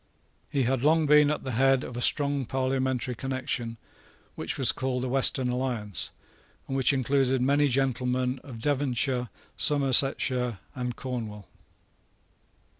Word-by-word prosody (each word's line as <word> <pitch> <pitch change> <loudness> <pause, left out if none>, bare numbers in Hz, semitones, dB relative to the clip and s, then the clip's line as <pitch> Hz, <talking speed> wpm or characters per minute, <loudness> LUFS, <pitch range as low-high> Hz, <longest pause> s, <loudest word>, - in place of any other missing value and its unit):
He 140 -2 0
had 130 0 0
long 155 +3 +3
been 150 0 +5
at 150 - -2
the 130 - -4
head 135 +2 +3
of 125 - -7
a 120 - -4
strong 140 -1 +1
parliamentary 130 -1 -1
connection, 125 -2 -4 0.6
which - - -4
was - - +5
called 130 -1 -2
the - - -1
Western 130 0 +1
Alliance, 120 - -2 0.6
and 135 - -3
which 135 0 +3
included 135 -1 +1
many 140 +3 +3
gentlemen 130 -1 0
of 125 -5 -9
Devonshire, 130 -2 0 0.3
Somersetshire, 135 -4 +2 0.2
and 125 -1 -4
Cornwall. 110 -6 -6
130 Hz, 130 wpm, -27 LUFS, 125-135 Hz, 0.6 s, been